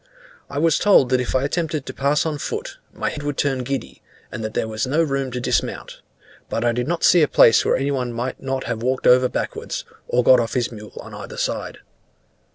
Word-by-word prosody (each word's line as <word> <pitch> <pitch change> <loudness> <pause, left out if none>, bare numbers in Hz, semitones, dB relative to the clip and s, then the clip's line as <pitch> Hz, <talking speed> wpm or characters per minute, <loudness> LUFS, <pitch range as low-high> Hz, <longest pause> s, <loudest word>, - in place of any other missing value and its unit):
I - - -6
was 160 +1 +3
told 190 -11 +5
that 130 -1 +2
if 125 - -3
I 130 - +2
attempted 155 0 -2
to - - -6
pass 140 +3 +1
on 155 -2 -2
foot, - - -5
my - - -3
head 145 - -6
would 145 -1 -3
turn 135 -2 0
giddy, 135 +2 -5 0.3
and 115 - -5
that 110 - -5
there - - 0
was 110 +1 -2
no 155 +5 +2
room 135 -3 -1
to 125 0 -4
dismount; 125 - -2 0.5
but 115 - -1
I 120 - +3
did 125 +2 -2
not 170 +1 -2
see 175 - +6
a 150 - +4
place 115 - +6
where - - +2
any 135 +2 -1
one 125 -3 -2
might 120 +2 -4
not 135 0 -2
have 115 -2 -4
walked 130 +2 -1
over 125 0 +5
backwards, - - -4 0.2
or 125 - +2
got 130 0 +6
off 115 -1 -2
his 120 -2 0
mule 105 -2 -11
on - - -11
either - - -8
side. - - -3
130 Hz, 230 wpm, -21 LUFS, 120-145 Hz, 0.5 s, see